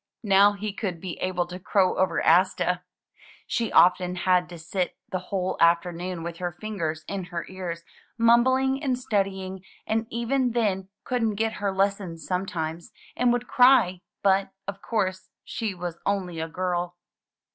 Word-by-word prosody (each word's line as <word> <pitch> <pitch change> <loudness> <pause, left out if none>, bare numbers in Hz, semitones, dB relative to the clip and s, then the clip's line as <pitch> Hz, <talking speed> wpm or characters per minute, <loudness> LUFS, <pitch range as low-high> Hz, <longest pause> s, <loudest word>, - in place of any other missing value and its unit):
Now 200 0 +5
he 205 0 -4
could 190 -5 -3
be 180 -1 -6
able 180 -1 0
to 180 +1 -8
crow 190 0 +2
over 185 - +1
Asta. 180 +1 +3 0.6
She 230 -2 -1
often 180 0 +4
had 180 0 +2
to 175 - -8
sit 175 +2 -3
the 185 - -1
whole 185 -2 -1
afternoon 170 +1 +1
with 170 0 -5
her 175 0 -3
fingers 170 -8 -3
in 195 -2 -4
her 175 -1 -5
ears, 175 -3 -6 0.3
mumbling 260 +4 +4
and 260 -3 +1
studying, 190 -5 -2 0.2
and 220 +1 0
even 240 +1 0
then 195 -5 0
couldn't 230 -4 0
get 220 +1 0
her 200 -1 +1
lessons 190 -3 -1
sometimes, 175 -3 -3 0.2
and 245 -1 +3
would 245 0 -1
cry; 245 -9 +5 0.2
but, 195 0 +3 0.2
of 200 0 -5
course, 185 -4 -2
she 220 -5 -3
was 175 -1 -5
only 185 -4 -1
a 160 - -2
girl. 175 0 -2
190 Hz, 155 wpm, -26 LUFS, 175-215 Hz, 0.6 s, Now